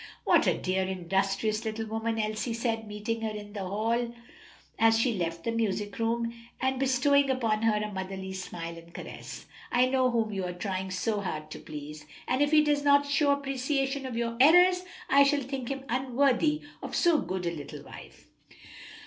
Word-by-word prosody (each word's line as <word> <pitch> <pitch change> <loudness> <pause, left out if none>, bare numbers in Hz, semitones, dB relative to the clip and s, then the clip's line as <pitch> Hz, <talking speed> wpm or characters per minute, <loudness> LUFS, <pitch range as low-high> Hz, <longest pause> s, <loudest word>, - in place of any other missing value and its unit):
"What - - +4
a - - +3
dear, 190 +1 0
industrious 195 +4 0
little 220 0 -3
woman," 225 +1 -2
Elsie 215 +2 -2
said, 225 -2 -2
meeting 210 +2 -3
her 220 - -1
in 210 -1 -8
the 205 - -5
hall 230 +4 -1 0.6
as 225 0 +5
she 235 +1 +2
left 170 -3 -3
the 230 - -1
music 210 -2 -2
room, 230 +1 0 0.3
and 260 0 0
bestowing 270 +2 +3
upon 225 -5 +1
her 225 -1 +3
a 210 0 -2
motherly 190 0 -5
smile 170 -3 -6
and 165 0 -16
caress. - - -8 0.3
"I 245 +1 +4
know 255 0 +2
whom 225 -3 0
you 195 -1 -2
are 180 - -4
trying 190 +1 -3
so 195 +3 -1
hard 155 -5 -5
to - - -7
please, 150 0 -9 0.2
and 260 - +1
if 290 - +4
he 305 0 +6
does 295 -1 +2
not 285 0 +5
show 285 +1 +2
appreciation 275 0 0
of 240 -3 -5
your 230 0 -2
efforts, 360 +6 +6 0.2
I 280 - +5
shall 280 0 +4
think 265 -1 -5
him 275 -1 -4
unworthy 265 +4 +1 0.2
of - - -5
so 340 -3 +4
good 185 -1 -3
a 170 - 0
little 150 -4 -8
wife." - - -13
225 Hz, 185 wpm, -29 LUFS, 195-265 Hz, 0.6 s, he